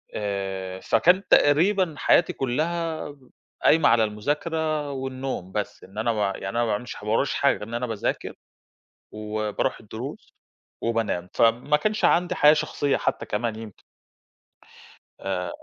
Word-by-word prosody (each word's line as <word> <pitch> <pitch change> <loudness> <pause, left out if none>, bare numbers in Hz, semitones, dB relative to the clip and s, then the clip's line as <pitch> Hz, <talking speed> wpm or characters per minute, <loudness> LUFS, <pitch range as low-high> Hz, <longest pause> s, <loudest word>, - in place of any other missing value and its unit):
آآ، 95 -2 -3
فكان 180 - +3
تقريبًا 170 +3 +4
حياتي 170 - +3
كلّها 155 +3 -2 0.5
قايمة 160 -1 +5
على 115 -1 +4
المذاكرة 150 +7 -1
والنوم 130 -7 -4
بس، 105 0 -4
إن 95 +2 -15
أنا 115 +2 +1
ب 110 - -5
يعني 100 -1 -1
أنا 115 - -2
ما - - +2
باعملش 110 +2 -3
ح - - -11
ما 105 - -2
وراييش 135 +5 +1
حاجة 140 - +2
غير - - -8
إن 115 - -9
أنا 125 +1 -2
باذاكر، 110 -3 -3 0.8
وباروح 105 0 -2
الدروس - - -8 0.5
وبانام، 110 -6 -1
فما 120 +6 +3
كانش 215 +7 0
عندي 175 +1 +3
حياة 150 +1 +7
شخصية 145 -2 0
حتى - - -2
كمان 110 +1 -2
يمكن. 110 -3 -10 1.4
آآ 90 -2 -3
120 Hz, 140 wpm, -25 LUFS, 105-150 Hz, 1.4 s, حياة